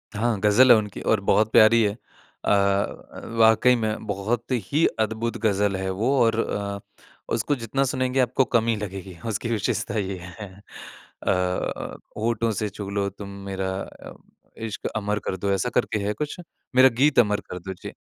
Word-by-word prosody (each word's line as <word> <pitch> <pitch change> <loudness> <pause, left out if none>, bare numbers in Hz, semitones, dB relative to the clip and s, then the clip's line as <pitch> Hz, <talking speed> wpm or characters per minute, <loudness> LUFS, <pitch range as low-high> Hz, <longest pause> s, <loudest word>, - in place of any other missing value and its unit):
हाँ, 110 -1 0
ग़ज़ल 110 +5 +6
है 115 - +9
उनकी 105 -2 -4
और 110 - +2
बहुत 110 +2 +2
प्यारी 115 +1 +6
है। 100 - +2 0.5
अ - - +2
अ, 100 0 0 0.2
वाक़ई 110 +3 +6
में 110 -2 -2
बहुत 105 +4 -1
ही 125 - +1
अद्भुत 110 +2 -1
ग़ज़ल 100 -1 +2
है 95 0 -3
वो 110 +8 0
और 115 0 +2
अ, 100 -2 -2 0.5
उसको 120 +6 0
जितना 130 +3 -1
सुनेंगे 130 0 0
आपको 130 +1 +2
कम 115 0 +1
ही 115 - +2
लगेगी। 95 -3 -7
उसकी 110 +2 -3
विशेषता 110 0 -1
ये 95 -1 -3 0.2
है। 105 -3 -7 0.8
अ, 90 0 -1 0.2
होठों 115 0 0
से 105 +1 -2
छू 100 0 -7
लो 100 0 -1
तुम 100 +1 -10 0.2
मेरा 95 -1 -3
अ, - - -10 0.5
इश्क़ 110 - -4
अमर 105 0 -1
कर 95 - -2
दो 100 +2 -1
ऐसा 110 +6 0
करके 105 - +1
है 105 - 0
कुछ 150 - -5 0.4
मेरा 130 +1 +8
गीत 145 -3 +5
अमर 105 -3 +3
कर 90 - -5
दो, 95 +2 -6
जी। - - -9
105 Hz, 175 wpm, -24 LUFS, 100-115 Hz, 0.8 s, है